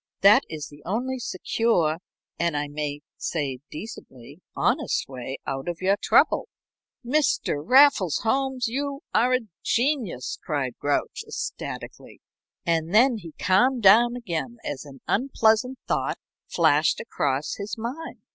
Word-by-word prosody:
That 210 +7 +7
is 150 -3 -5
the 145 0 -15
only 250 +7 -2
secure 185 -7 0 0.4
and 170 -3 +1
I 145 0 -1
may 145 0 -4 0.2
say 140 -6 -3
decently 150 - -10
honest 275 +4 0
way 130 0 -6
out 135 +2 -4
of 170 - -4
your 190 +2 +3
trouble." - - +3 0.6
"Mr. 260 - +1
Raffles 260 - +5
Holmes, 265 +1 0
you 280 +4 -3
are 250 +1 +4
a 255 - 0 0.2
genius!" 240 - -1
cried 140 -5 -2
Grouch, 145 0 -1
ecstatically. - - -6 0.5
And 165 +2 0
then 245 +1 +5
he 170 -6 -10
calmed 230 +7 +2
down 235 +5 +6
again 235 0 -4
as 140 +1 -5
an 135 -2 -13
unpleasant 245 +1 +2
thought - - 0 0.3
flashed 155 -2 +3
across 140 -10 -2
his 205 +2 -5
mind. 255 +9 -6
195 Hz, 130 wpm, -25 LUFS, 150-250 Hz, 0.6 s, That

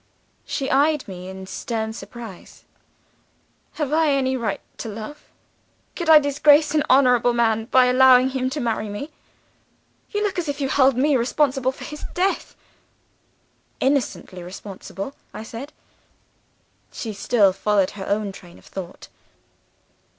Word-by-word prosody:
"She 270 - -2
eyed 295 +2 +2
me 185 -1 -8
in 190 0 -8
stern 220 +2 -4
surprise. 230 -4 -11 1.1
'Have 300 -2 -3
I 320 -1 +3
any 265 -2 +1
right 225 -5 -2 0.2
to 225 - -5
love? 225 +8 -8 0.7
Could 345 -3 -3
I 315 - +10
disgrace 295 +1 +4
an 305 - +3
honorable 250 -2 +4
man 225 -2 +1
by 255 +1 +4
allowing 255 0 +6
him 260 -1 -1
to 285 +3 -4
marry 225 -4 -2
me? 245 +10 -6 1.0
You 415 0 -2
look 400 -3 -1
as 330 -4 -3
if 285 - -3
you 270 -1 -1
held 265 -2 +3
me 285 +2 +3
responsible 260 +1 +1
for - - -11
his 300 0 -8
death.' 375 +2 -1 1.2
"'Innocently 215 -10 -1
responsible,' 195 +5 -8 0.2
I 215 - -6
said. 235 +6 -8 1.2
"She 220 -3 -5
still 200 -1 +3
followed 200 -1 +1
her 195 -2 -8
own 205 0 -1
train 175 -2 -14
of - - -20
thought. 185 -2 -8
250 Hz, 140 wpm, -22 LUFS, 210-285 Hz, 1.2 s, I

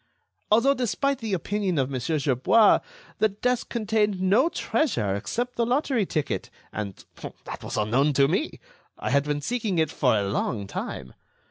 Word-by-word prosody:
Although 235 +6 +5
despite 275 +2 -1
the 220 -4 -1
opinion 190 0 -1
of 135 0 0
Monsieur 130 +5 -1
Gerbois, 145 - +4 0.4
the 220 - +4
desk 245 +5 -1
contained 215 -3 0
no 205 - +3
treasure 125 - 0
except 245 - -3
the 235 - +2
lottery 245 - +1
ticket—and 105 - -5 0.4
that - - -7
was - - -4
unknown 125 +8 +2
to 140 0 +4
me—I 320 - -4
had 140 0 +3
been 145 0 -1
seeking 220 -1 -1
it 160 -1 +2
for 125 -6 +2
a 100 -1 0
long 100 +1 -2
time. 65 -9 -6
190 Hz, 150 wpm, -25 LUFS, -, 0.4 s, Although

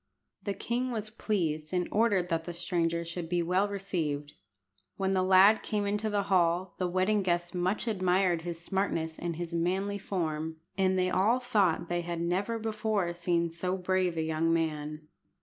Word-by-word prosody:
The 200 -2 -3
king 245 +2 -1
was 215 -3 -4
pleased, 165 -7 -1
and 180 -1 +1
ordered 205 -5 +2
that 165 -1 -1
the 175 - -5
stranger 170 -1 -1
should 170 0 -5
be 175 -1 +1
well 185 +4 +2
received. 165 -8 -3 0.6
When 190 0 0
the 190 -1 +2
lad 190 +3 +6
came 210 -1 -1
into 210 +2 0
the 205 -1 +1
hall, 180 -1 +2
the 180 - +1
wedding 185 +4 +2
guests 175 -1 0
much 185 +6 -1
admired 185 -4 +2
his 170 0 -5
smartness 170 -3 -2
and 170 -1 -3
his 170 0 -5
manly 190 +4 0
form, 160 -5 -2 0.2
and 190 -1 +2
they 185 0 +1
all 220 +8 +3
thought 200 -9 +1
they 175 0 -1
had 170 0 -4
never 185 +7 0
before 215 -5 -1
seen 170 -1 0
so 180 +3 -2
brave 185 -2 0
a 160 - +1
young 160 +1 +1
man. 155 -2 -2
180 Hz, 175 wpm, -30 LUFS, 170-200 Hz, 0.6 s, lad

